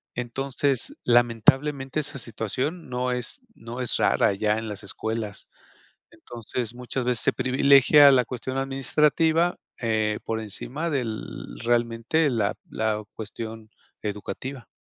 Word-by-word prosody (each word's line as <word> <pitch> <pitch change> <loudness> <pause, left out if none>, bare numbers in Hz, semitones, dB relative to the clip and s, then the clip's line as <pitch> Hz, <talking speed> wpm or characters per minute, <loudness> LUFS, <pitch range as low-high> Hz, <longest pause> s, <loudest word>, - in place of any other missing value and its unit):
Entonces, 135 +2 0
lamentablemente 135 +4 +3
esa 145 - -1
situación 125 - -3
no 125 0 -1
es 125 - -2 0.2
no 115 +2 -8
es 125 - +2
rara, - - +3
ya 105 +2 +1
en 110 - -6
las 105 0 -5
escuelas. 110 +1 -4 0.7
Entonces, 120 0 -6
muchas 125 +1 -3
veces, 125 -2 +3
se - - +3
privilegia 140 +2 +6
la 125 -2 +4
cuestión 130 +2 -5
administrativa, 150 +5 +2 0.2
eh, 110 -2 0
por 115 - -2
encima 130 - -4
del 120 -7 -2 0.4
realmente, 120 +6 +1
la 110 -5 0 0.2
la 110 -1 -1
cuestión 110 0 -7 0.3
educativa. 115 +4 -5
125 Hz, 120 wpm, -25 LUFS, 110-135 Hz, 0.7 s, privilegia